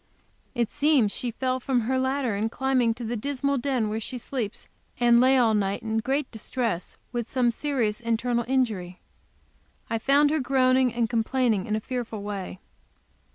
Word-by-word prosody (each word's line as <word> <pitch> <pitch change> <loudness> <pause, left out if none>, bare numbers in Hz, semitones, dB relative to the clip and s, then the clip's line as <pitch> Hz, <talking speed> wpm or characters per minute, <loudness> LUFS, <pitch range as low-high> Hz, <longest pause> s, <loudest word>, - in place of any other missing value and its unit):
It 235 -3 0
seems 280 -8 +3
she 245 - -3
fell 255 +2 -1
from 255 -1 0
her 260 +4 0
ladder 260 -4 0
in 215 +3 -1
climbing 250 -2 +1
to 240 - -7
the 235 +1 -2
dismal 280 +3 -1
den 255 -4 0
where 215 +1 -2
she 250 +3 -5
sleeps, 235 -3 -5 0.3
and 240 0 +5
lay 260 +1 +5
all 235 -3 +4
night 200 -1 0
in 220 0 0
great 270 +4 -1
distress 225 -4 -3
with 240 -2 -3
some 250 -2 +2
serious 240 -5 -1
internal 235 +1 0
injury. 215 -9 -1 0.9
I 225 - 0
found 285 +4 +4
her 315 - +1
groaning 255 -1 +3
and 235 0 0
complaining 230 -3 +1
in 215 - 0
a - - 0
fearful 230 -3 -5
way. 200 -3 -5
240 Hz, 170 wpm, -26 LUFS, 220-260 Hz, 0.9 s, and